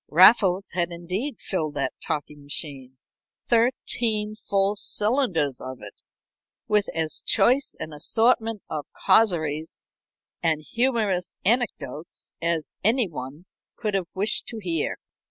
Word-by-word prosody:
Raffles 190 +2 +6
had 175 -1 0
indeed 185 - -4
filled 155 -6 -3
that 135 -2 -1
talking 150 0 -4
machine 140 -3 -4 0.5
thirteen 230 -3 +1
full 200 -1 0
cylinders 205 - +1
of 130 0 -6
it 105 - -9 0.7
with 210 -1 +2
as 160 -1 -2
choice 265 +3 +3
an 155 - -6
assortment 225 +6 +1
of 150 - -5
causeries 160 - +1 0.6
and 160 -2 +1
humorous 225 -7 0
anecdotes 215 - -1
as 170 -2 -1
any 225 +2 +3
one 145 +1 -8 0.3
could 215 -3 -3
have 190 -3 0
wished 205 +3 +2
to 230 - -6
hear. 170 -7 -2
185 Hz, 120 wpm, -25 LUFS, 155-220 Hz, 0.7 s, Raffles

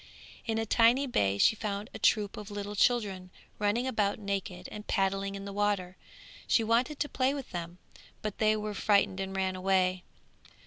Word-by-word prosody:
In 225 -1 0
a 225 - 0
tiny 235 +5 +4
bay 100 - +1
she 220 - +5
found 205 -1 -4
a - - -7
troop 210 -2 +2
of 210 0 -8
little 205 0 -5
children 200 -5 +1 0.3
running 210 +4 +1
about 210 -6 0
naked 200 -2 -4
and 210 0 -8
paddling 195 0 0
in 195 0 -7
the 200 - -6
water; 200 -3 0 0.5
she 230 - +3
wanted 240 +6 +1
to 295 - +1
play 265 0 0
with 275 -3 -7
them, 170 0 -5 0.5
but 215 -2 -4
they 215 0 +3
were 210 0 -4
frightened 200 -2 +2
and 195 0 -4
ran 190 -1 0
away. 185 -1 +1
205 Hz, 180 wpm, -30 LUFS, 195-220 Hz, 0.5 s, she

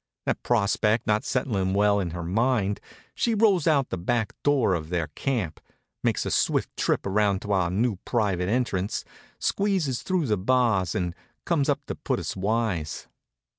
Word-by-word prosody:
That - - -1
prospect 110 0 +2
not 105 -1 +2
setting 100 -8 0
well 100 0 +4
on 90 - -2
her 85 +1 -5
mind, 105 +2 +1 0.3
she 230 -2 +1
rolls 200 -7 +3
out 140 -5 +3
the 95 - -2
back 110 +3 0
door 140 -9 +3
of 80 -3 -3
their 85 -4 -1
camp, 105 - -2 0.4
makes - - 0
a - - -2
swift - - +1
trip - - 0
around 100 -1 +1
to 105 - -4
our 95 -3 +2
new 105 +3 0
private 95 -4 0
entrance, 105 -5 -1 0.3
squeezes 185 - 0
through 185 -4 0
the 105 -4 +1
bars, 110 -5 +2
and 90 -2 -1 0.3
comes 155 -5 +1
up - - 0
to - - -4
put - - -2
us - - -4
wise. 100 -5 -1
105 Hz, 170 wpm, -26 LUFS, 95-125 Hz, 0.4 s, well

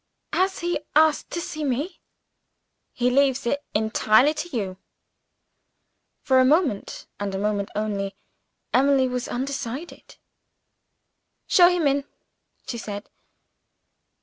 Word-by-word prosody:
"Has 380 +1 +1
he 350 -2 0 0.2
asked 310 -1 +4
to 345 - -3
see 310 -2 -5
me?" 290 +6 -2 0.9
"He 250 0 0
leaves 270 0 +2
it 285 +4 -1
entirely 220 +5 +3
to 315 +3 -5
you." 195 - -3 1.5
For 260 -2 +4
a - - +6
moment, 275 - +1
and 200 -1 -3
a - - -1
moment 200 0 -1
only, 200 -2 -2 0.6
Emily 270 0 +4
was 250 -1 -3
undecided. 270 +3 -5 1.3
"Show 350 -1 +6
him 355 -3 0
in," 280 0 +2 0.6
she 235 - -5
said. 205 -2 -7
260 Hz, 115 wpm, -24 LUFS, 215-300 Hz, 1.5 s, a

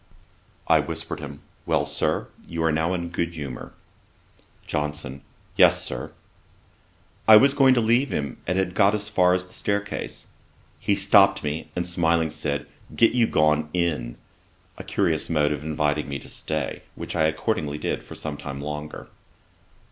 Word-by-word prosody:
I - - +5
whispered - - -4
him, 70 -1 -8 0.3
'Well, - - +2
Sir, - - -1 0.2
you 85 -1 -3
are 80 - +3
now 80 +4 +1
in 85 -1 -4
good 85 0 -2
humour.' 70 -5 -6 0.9
JOHNSON. 75 -2 -3 0.3
'Yes, - - +5
Sir.' - - -5 1.2
I 110 -1 +11
was 140 +5 +5
going 135 -2 +5
to 120 - +3
leave 120 +5 +3
him, 70 -3 -3
and 90 +2 0
had 95 -1 0
got 100 +3 +4
as 105 0 -3
far 90 0 +4
as 90 0 -2
the 90 - -15
staircase. 100 0 -3 0.5
He - - +1
stopped - - +5
me, 75 +2 -3
and 90 0 -1
smiling, 85 -2 +1
said, 70 -1 -3 0.3
'Get 115 - +5
you 120 -2 +3
gone 75 0 +2
in;' 80 -9 -1 0.6
a - - -9
curious 80 -2 0
mode 75 -3 +2
of 75 0 -3
inviting 75 -1 -1
me 70 - -3
to - - -12
stay, 75 -4 -4
which - - -6
I 80 -2 +3
accordingly 75 -1 -1
did 75 - -2
for - - -11
some 75 -2 -5
time 70 -1 -6
longer. 75 +1 -6
80 Hz, 165 wpm, -24 LUFS, 75-90 Hz, 1.2 s, I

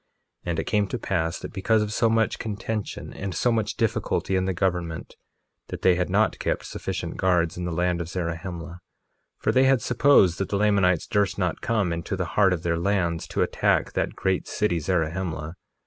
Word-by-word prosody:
1:18 - - -1
And 85 - -1
it - - 0
came 105 -2 +1
to 125 - -3
pass 85 -6 -1
that - - -8
because 105 +2 +2
of 105 0 -4
so 115 +1 +2
much 115 0 +1
contention 110 0 -4
and 95 -3 -5
so 120 - +2
much 110 -2 0
difficulty 110 -3 0
in 95 0 +1
the 95 - 0
government, 85 -3 -2 0.5
that - - -7
they 95 - +6
had 90 0 -1
not - - +2
kept - - -1
sufficient - - -5
guards 90 -3 +2
in 90 - -4
the 85 - -2
land 90 +1 0
of 85 - -5
Zarahemla; 85 0 -5 0.6
for - - 0
they 130 +1 +4
had 135 -1 +4
supposed 120 -9 +4
that 95 - -2
the 100 - 0
Lamanites 100 -5 +3
durst 100 -2 0
not 90 -4 -1
come 105 -7 0
into 85 +3 -3
the 90 -1 -2
heart 95 -2 +4
of 90 -2 -1
their 85 -1 0
lands 85 -3 0
to - - 0
attack - - +1
that - - -1
great 95 -1 -1
city 95 -5 0
Zarahemla. 80 -1 -2
95 Hz, 200 wpm, -25 LUFS, 85-105 Hz, 0.6 s, they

